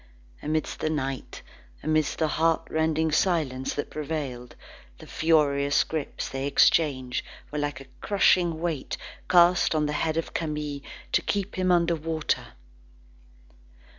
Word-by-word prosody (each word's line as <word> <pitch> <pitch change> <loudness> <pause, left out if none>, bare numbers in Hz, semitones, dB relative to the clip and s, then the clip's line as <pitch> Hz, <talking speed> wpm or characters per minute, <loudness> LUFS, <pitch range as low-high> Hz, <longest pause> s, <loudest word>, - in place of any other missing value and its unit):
Amidst 155 +1 -2
the 155 - 0
night, 135 -3 -4 0.4
amidst 155 -1 +1
the 160 - +2
heartrending 160 0 +1
silence 150 -6 0
that 145 - -4
prevailed, 140 -5 -5 0.4
the - - -12
furious 145 -3 +2
grips 155 -2 -4
they 135 +1 -3
exchanged, 140 -3 +3 0.3
were 150 - -2
like 145 -2 -2
a 135 - -11 0.2
crushing 180 -5 +3
weight 165 -5 -3 0.3
cast 175 -1 +5
on 155 -1 +2
the 150 - -1
head 160 +1 0
of 165 - -3
Camille 150 -3 -3 0.3
to - - +3
keep 200 0 -2
him 185 -1 +1
under 170 -1 +3
water. 160 -1 -2
155 Hz, 130 wpm, -26 LUFS, 145-165 Hz, 0.4 s, cast